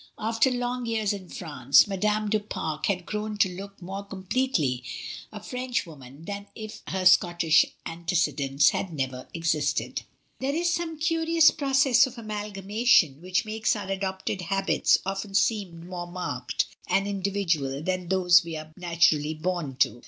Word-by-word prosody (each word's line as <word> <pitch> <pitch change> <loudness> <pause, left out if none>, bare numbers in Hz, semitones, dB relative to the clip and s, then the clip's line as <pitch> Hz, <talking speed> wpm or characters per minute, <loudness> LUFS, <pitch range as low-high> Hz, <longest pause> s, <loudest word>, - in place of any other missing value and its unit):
After 225 +4 +2
long 245 -1 -2
years 220 -3 0
in 190 -3 -8
France, 140 -4 +3
Madame 210 +2 0
du 215 +1 +2
Pare 160 -7 -4
had 180 -3 -1
grown 210 +1 -4
to 205 - +4
look 200 +1 -9
more 195 +2 -6
com 195 -1 -9
pletely 180 - 0 0.5
a 215 - -7
Frenchwoman 165 - -5
than 200 +1 -6
if 215 0 -8
her 185 -1 -2
Scottish 175 -3 +5 0.2
ante 170 +2 -4
cedents 145 -3 +3
had 190 - -3
never 130 -4 -4
existed. 165 -2 0 0.4
There 275 +2 -1
is 340 +1 +1
some 330 -2 -3
curious 330 0 +4
process 270 -2 +3
of 255 -1 -11
amalgamation 210 - +1
which 185 +4 0
makes 220 +1 0
our 200 -2 -5
adopted 190 0 -3
habits 195 +2 +2
often 195 +1 -4
seem 195 -5 0
more 175 -1 -5
marked 145 -9 -2 0.2
and 195 +1 +1
individual 185 -8 -1
than 185 0 -2
those 180 -2 +5
we 165 -1 -6
are 155 0 -8
naturally 170 -3 +2
bom 160 -4 -3
to. 120 -2 +1
190 Hz, 150 wpm, -26 LUFS, 165-215 Hz, 0.5 s, Scottish